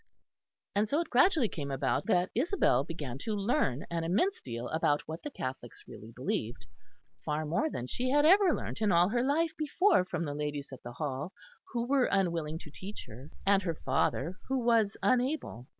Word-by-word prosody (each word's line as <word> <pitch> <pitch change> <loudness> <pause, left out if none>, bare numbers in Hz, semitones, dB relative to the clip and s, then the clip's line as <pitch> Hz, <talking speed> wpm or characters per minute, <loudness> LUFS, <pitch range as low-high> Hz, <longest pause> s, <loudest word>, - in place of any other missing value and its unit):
And 210 +1 +1
so 290 - +2
it 335 - -7
gradually 270 - +4
came 145 -7 -5
about 135 +9 -1
that 180 -4 +2
Isabel 255 - +2
began 140 -5 -6
to 215 +8 -2
learn 200 - 0
an 165 -1 -1
immense 210 - +1
deal 120 0 -5
about 150 -2 +1
what 160 +1 -6
the 295 - -5
Catholics 130 - -6
really 110 +2 -11
believed 120 -1 -3 0.6
far 150 +1 -1
more 175 - 0
than 120 - -4
she 250 - -2
had 290 +2 +4
ever 380 +2 +6
learnt - - -4
in 210 -2 +3
all 175 +1 +4
her 240 +2 +1
life 310 +5 +1
before 310 - +3
from 175 -2 -3
the 145 - -3
ladies 145 -1 -4
at 130 - -10
the 120 - -8
Hall, 145 +4 -4 0.4
who 235 -1 -1
were 265 0 +3
unwilling 170 -5 0
to 150 - -12
teach 195 +7 -8
her, 130 +7 -11 0.2
and 200 0 +4
her 170 -4 -2
father, 140 +5 -1
who 265 - 0
was 230 -4 +2
unable. 255 - 0
180 Hz, 190 wpm, -31 LUFS, -, 0.6 s, ever